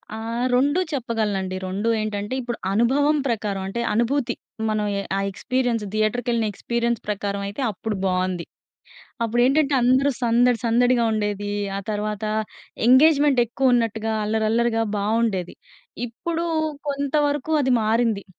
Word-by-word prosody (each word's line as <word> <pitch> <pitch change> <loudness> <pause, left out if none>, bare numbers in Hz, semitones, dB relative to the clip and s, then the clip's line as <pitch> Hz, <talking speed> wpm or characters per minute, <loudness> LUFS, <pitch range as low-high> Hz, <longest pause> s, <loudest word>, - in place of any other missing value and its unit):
ఆ! - - -6 0.4
రొండూ 285 +7 +3
చెప్పగలనండి. 215 -8 -2
రొండూ 200 +5 -1
ఏంటంటే, 205 +2 -3
ఇప్పుడు 240 -1 -4 0.2
అనుభవం 285 +7 +3
ప్రకారవంటే, 205 -1 -2
అనుభూతి. 240 +2 0 0.3
మనం 215 -1 0
ఎ - - -1 0.2
ఆ - - 0
ఎక్స్‌పీరియన్స్ 245 0 -1
థియేటర్‌కెళ్ళిన 225 +1 0
ఎక్స్‌పీరియన్స్ 235 +2 -1
ప్రకారమయితే, 200 +2 -3
అప్పుడు 210 +2 -4
బావుంది. 185 -2 -1 0.8
అప్పుడేంటంటే, 270 +5 +2
అందరూ 260 +3 +4
సందడి 240 0 +3
సందడిగా 240 +1 +3
ఉండేది. 205 -1 -2 0.2
ఆ - - -2
తర్వాతా 210 0 -2 0.6
ఎంగేజ్‌మెంటెక్కువున్నట్టుగా, 250 -5 +3
అల్లరి 220 +1 0
అల్లరిగా 230 0 +1 0.2
బావుండేది. 210 -3 0 0.5
ఇప్పుడూ 335 +8 -3 0.4
కొంతవరుకూ 290 +1 0
అది 260 - +2
మారింది, 220 -2 +1
230 Hz, 110 wpm, -23 LUFS, 210-255 Hz, 0.8 s, అందరూ